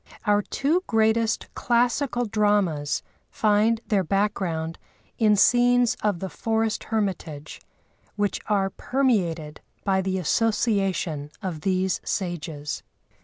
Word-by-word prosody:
Our 205 Hz, 0 st, +3 dB
two 310 Hz, -, 0 dB
greatest 225 Hz, 0 st, +2 dB
classical 245 Hz, +1 st, +1 dB
dramas 205 Hz, -9 st, +1 dB, 0.3 s
find 220 Hz, +2 st, +2 dB
their 200 Hz, -3 st, +1 dB
background 180 Hz, -4 st, -1 dB, 0.4 s
in 215 Hz, -2 st, +5 dB
scenes 245 Hz, +2 st, +4 dB
of 205 Hz, -4 st, +1 dB
the 190 Hz, -, -4 dB
forest 220 Hz, +4 st, -1 dB
hermitage, 180 Hz, -9 st, -3 dB, 0.5 s
which 205 Hz, -1 st, -1 dB
are 195 Hz, -2 st, +1 dB
permeated 180 Hz, -, -1 dB, 0.2 s
by 190 Hz, -1 st, +2 dB
the 190 Hz, 0 st, -1 dB
association 195 Hz, -6 st, 0 dB
of 170 Hz, -5 st, -4 dB
these 185 Hz, +1 st, 0 dB
sages. 160 Hz, -5 st, -3 dB
205 Hz, 105 wpm, -25 LUFS, 175-225 Hz, 0.5 s, in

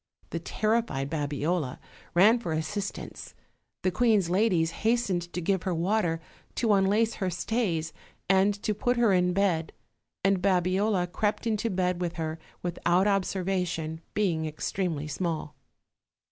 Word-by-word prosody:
The -, -, -2 dB
terrified 215 Hz, -11 st, -1 dB
Babiola 150 Hz, -1 st, -1 dB, 0.4 s
ran 215 Hz, +7 st, +6 dB
for 170 Hz, -9 st, -3 dB
assistance; 190 Hz, +6 st, -4 dB, 0.5 s
the 185 Hz, -, +2 dB
queen's 205 Hz, -3 st, +3 dB
ladies 180 Hz, -5 st, +2 dB
hastened 200 Hz, -7 st, +1 dB
to -, -, -3 dB
give 190 Hz, +2 st, +1 dB
her 185 Hz, -2 st, -1 dB
water, 175 Hz, -1 st, +1 dB, 0.4 s
to 225 Hz, -3 st, +2 dB
unlace 205 Hz, +4 st, +3 dB
her 190 Hz, -, +1 dB
stays, 175 Hz, -4 st, -1 dB, 0.3 s
and 195 Hz, +2 st, +4 dB
to 215 Hz, -, +1 dB
put 245 Hz, +4 st, 0 dB
her 230 Hz, -4 st, +4 dB
in 180 Hz, -1 st, +3 dB
bed, 180 Hz, -4 st, +1 dB, 0.5 s
and 195 Hz, -1 st, +3 dB
Babiola 185 Hz, +1 st, +2 dB
crept 210 Hz, +5 st, -1 dB
into 225 Hz, 0 st, 0 dB
bed 180 Hz, -2 st, 0 dB
with 175 Hz, -1 st, -1 dB
her 160 Hz, -1 st, -4 dB, 0.2 s
without 175 Hz, +1 st, +1 dB
observation, 180 Hz, -5 st, -1 dB
be 205 Hz, -3 st, +2 dB
ing 160 Hz, -1 st, -2 dB
extremely 155 Hz, 0 st, -2 dB
small. 155 Hz, -1 st, -3 dB
185 Hz, 135 wpm, -28 LUFS, 165-205 Hz, 0.5 s, ran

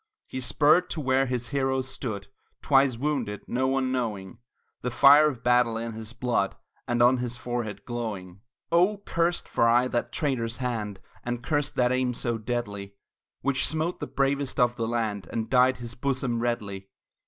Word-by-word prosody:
He 130 Hz, -, -6 dB
spurred 150 Hz, +6 st, +3 dB
to -, -, -3 dB
where 135 Hz, -1 st, +2 dB
his 125 Hz, -2 st, -3 dB
heroes 130 Hz, -1 st, 0 dB
stood 110 Hz, -7 st, -4 dB, 0.4 s
Twice 135 Hz, -4 st, +4 dB
wounded, 125 Hz, -7 st, -2 dB
no 130 Hz, +2 st, 0 dB
one 130 Hz, -1 st, 0 dB
knowing 105 Hz, -7 st, -3 dB, 0.4 s
The 125 Hz, -, -2 dB
fire 145 Hz, +4 st, +7 dB
of 125 Hz, -5 st, -8 dB
battle 120 Hz, -2 st, +3 dB
in 115 Hz, 0 st, -4 dB
his 110 Hz, 0 st, -7 dB
blood 120 Hz, -5 st, -1 dB, 0.3 s
And 120 Hz, 0 st, +2 dB
on 125 Hz, +2 st, +5 dB
his 125 Hz, 0 st, -3 dB
forehead 120 Hz, -4 st, -4 dB
glowing. 100 Hz, -6 st, -5 dB, 0.3 s
Oh! 180 Hz, +5 st, +4 dB
cursed 170 Hz, +1 st, 0 dB
for 115 Hz, -, +2 dB
aye 120 Hz, +2 st, +4 dB
that 120 Hz, -1 st, -1 dB
traitor's 120 Hz, -6 st, -1 dB
hand, 110 Hz, -6 st, -3 dB, 0.2 s
And 120 Hz, -1 st, -3 dB
cursed 145 Hz, +1 st, -1 dB
that 125 Hz, 0 st, +2 dB
aim 130 Hz, -1 st, 0 dB
so 120 Hz, -2 st, -1 dB
deadly, 105 Hz, -4 st, -4 dB, 0.5 s
Which 135 Hz, 0 st, +1 dB
smote 160 Hz, +3 st, -2 dB
the -, -, -4 dB
bravest 140 Hz, 0 st, -1 dB
of 120 Hz, -1 st, +3 dB
the 115 Hz, -2 st, -2 dB
land, 110 Hz, -4 st, -2 dB
And 110 Hz, 0 st, -3 dB
dyed 130 Hz, 0 st, +4 dB
his 120 Hz, -1 st, -7 dB
bosom 130 Hz, -2 st, -1 dB
redly. 100 Hz, -5 st, -3 dB
125 Hz, 170 wpm, -27 LUFS, 115-135 Hz, 0.5 s, fire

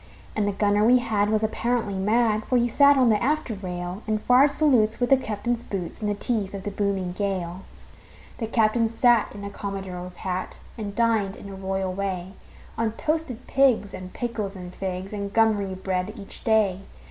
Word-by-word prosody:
And 210 Hz, -1 st, +1 dB
the -, -, +1 dB
gunner 205 Hz, +1 st, +2 dB
we 245 Hz, +3 st, +6 dB
had 215 Hz, -4 st, +1 dB
was 215 Hz, 0 st, +1 dB
apparently 225 Hz, -1 st, 0 dB
mad, 215 Hz, +2 st, +2 dB
For 255 Hz, -, +2 dB
he 240 Hz, 0 st, +3 dB
sat 280 Hz, +4 st, +5 dB
on 260 Hz, -, +5 dB
the 215 Hz, -3 st, +3 dB
after 295 Hz, -3 st, 0 dB
rail, 180 Hz, -1 st, -5 dB
And 215 Hz, 0 st, +1 dB
fired 250 Hz, +6 st, +5 dB
salutes 260 Hz, -7 st, +2 dB
with 245 Hz, +1 st, 0 dB
the -, -, +9 dB
captain's 235 Hz, -1 st, -2 dB
boots, 190 Hz, -1 st, -5 dB
In 210 Hz, -, -1 dB
the 205 Hz, -, 0 dB
teeth 205 Hz, -3 st, -2 dB
of 195 Hz, -, -6 dB
the 205 Hz, -, -3 dB
booming 195 Hz, -3 st, -1 dB
gale. 185 Hz, -2 st, -3 dB, 0.8 s
The 225 Hz, -, -2 dB
captain 225 Hz, 0 st, +2 dB
sat 235 Hz, 0 st, +3 dB
in 200 Hz, -, -9 dB
a 200 Hz, -, -5 dB
commodore's 190 Hz, -3 st, -6 dB
hat 185 Hz, 0 st, -4 dB, 0.2 s
And 205 Hz, -3 st, -6 dB
dined, 220 Hz, -4 st, +1 dB
in 200 Hz, -, -10 dB
a 195 Hz, -, -7 dB
royal 190 Hz, -1 st, -2 dB
way, 190 Hz, -1 st, -3 dB, 0.5 s
On 225 Hz, -1 st, 0 dB
toasted 305 Hz, -3 st, -2 dB
pigs 255 Hz, -7 st, +2 dB
and 185 Hz, 0 st, -7 dB
pickles 220 Hz, -5 st, -3 dB
and 180 Hz, -1 st, -8 dB
figs 190 Hz, +1 st, -4 dB
And 200 Hz, -1 st, -4 dB
gummery 205 Hz, -3 st, +2 dB
bread, 185 Hz, +1 st, -2 dB
each 200 Hz, -2 st, -10 dB
day. 215 Hz, -4 st, +2 dB
210 Hz, 190 wpm, -25 LUFS, 195-230 Hz, 0.8 s, the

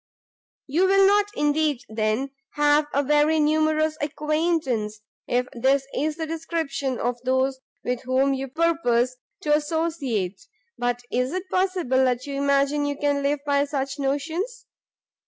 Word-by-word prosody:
"You 335 Hz, +7 st, +2 dB
will 390 Hz, 0 st, +5 dB
not, 410 Hz, +1 st, +4 dB
indeed, 295 Hz, -2 st, +1 dB
then, 220 Hz, +5 st, -1 dB, 0.2 s
have 295 Hz, 0 st, +3 dB
a 280 Hz, -, +1 dB
very 295 Hz, +2 st, +3 dB
numerous 310 Hz, 0 st, +2 dB
acquaintance, 300 Hz, -8 st, -1 dB, 0.3 s
if 250 Hz, +1 st, +1 dB
this 265 Hz, +3 st, +2 dB
is 300 Hz, +2 st, 0 dB
the 325 Hz, 0 st, -3 dB
description 310 Hz, -5 st, -3 dB
of 240 Hz, 0 st, -2 dB
those 260 Hz, +1 st, +1 dB, 0.2 s
with 250 Hz, -1 st, -2 dB
whom 260 Hz, +2 st, +2 dB
you 270 Hz, 0 st, -3 dB
purpose 255 Hz, -5 st, +1 dB, 0.2 s
to 295 Hz, -, +1 dB
associate! 295 Hz, -, -1 dB, 0.3 s
but 245 Hz, 0 st, -2 dB
is 250 Hz, +4 st, 0 dB
it 370 Hz, +1 st, -3 dB
possible 350 Hz, -9 st, +2 dB
you 285 Hz, -, -6 dB
imagine 280 Hz, +1 st, +2 dB
you 285 Hz, -1 st, -2 dB
can 285 Hz, -1 st, +1 dB
live 280 Hz, +1 st, 0 dB
by 285 Hz, 0 st, +2 dB
such 275 Hz, -1 st, -3 dB
notions? 330 Hz, -, -2 dB
285 Hz, 135 wpm, -24 LUFS, 260-315 Hz, 0.3 s, will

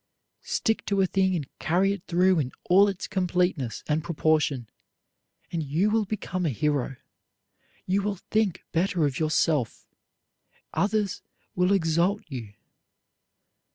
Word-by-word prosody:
Stick 220 Hz, -1 st, -1 dB
to 200 Hz, -1 st, +2 dB
a -, -, +4 dB
thing 190 Hz, 0 st, +1 dB
and 150 Hz, -6 st, -3 dB
carry 190 Hz, +4 st, +2 dB
it 200 Hz, -, -7 dB
through 180 Hz, 0 st, +3 dB
in 130 Hz, -4 st, -1 dB, 0.2 s
all 195 Hz, +3 st, +7 dB
its 195 Hz, -2 st, -3 dB
completeness 180 Hz, -8 st, 0 dB
and 155 Hz, +1 st, 0 dB
proportion, 150 Hz, -6 st, +1 dB, 0.8 s
and 170 Hz, -, -1 dB
you 160 Hz, +8 st, +1 dB
will 220 Hz, -1 st, +2 dB
become 185 Hz, -3 st, -3 dB
a 165 Hz, -, +2 dB
hero. 140 Hz, 0 st, -1 dB, 0.9 s
You 190 Hz, +2 st, +1 dB
will 205 Hz, 0 st, -1 dB
think 210 Hz, 0 st, -1 dB
better 170 Hz, -1 st, +1 dB
of 140 Hz, -3 st, -1 dB
yourself; 155 Hz, -4 st, +1 dB, 0.9 s
others 200 Hz, +2 st, 0 dB, 0.3 s
will 180 Hz, +1 st, +2 dB
exalt 175 Hz, +2 st, +2 dB
you. 115 Hz, -8 st, -7 dB
175 Hz, 130 wpm, -26 LUFS, 155-195 Hz, 0.9 s, all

